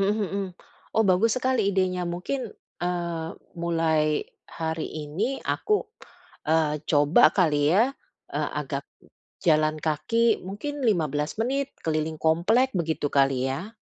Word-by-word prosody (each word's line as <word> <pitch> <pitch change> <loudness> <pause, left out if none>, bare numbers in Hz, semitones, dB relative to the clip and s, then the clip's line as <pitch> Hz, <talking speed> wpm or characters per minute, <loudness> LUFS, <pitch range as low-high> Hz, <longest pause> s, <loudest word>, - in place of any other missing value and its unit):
mhm 205 +2 +1
mhm. 200 0 -1 0.5
Oh, 220 - +5
bagus 215 +6 +3
sekali 255 -5 +1
idenya. 185 -2 +1
Mungkin, 220 +9 -3 0.3
eee, 170 -2 -2 0.3
mulai 160 -3 +1 0.2
hari 160 -1 -3 0.2
ini 205 - -2
aku, 425 -1 0 0.6
eee, 155 -2 +2
coba 145 +8 +4
kali 150 -5 +3
ya, 240 +6 +4 0.4
eee, - - -1
agak - - -4 0.6
jalan 155 -2 +4
kaki 220 +9 +2
mungkin 285 +10 -5
15 150 -6 0
menit 275 +4 -1
keliling 155 0 -1
komplek, 195 +11 +3
begitu 160 -3 -1
kali, 135 -2 +2
ya? 190 - -5
170 Hz, 120 wpm, -26 LUFS, 155-220 Hz, 0.6 s, Oh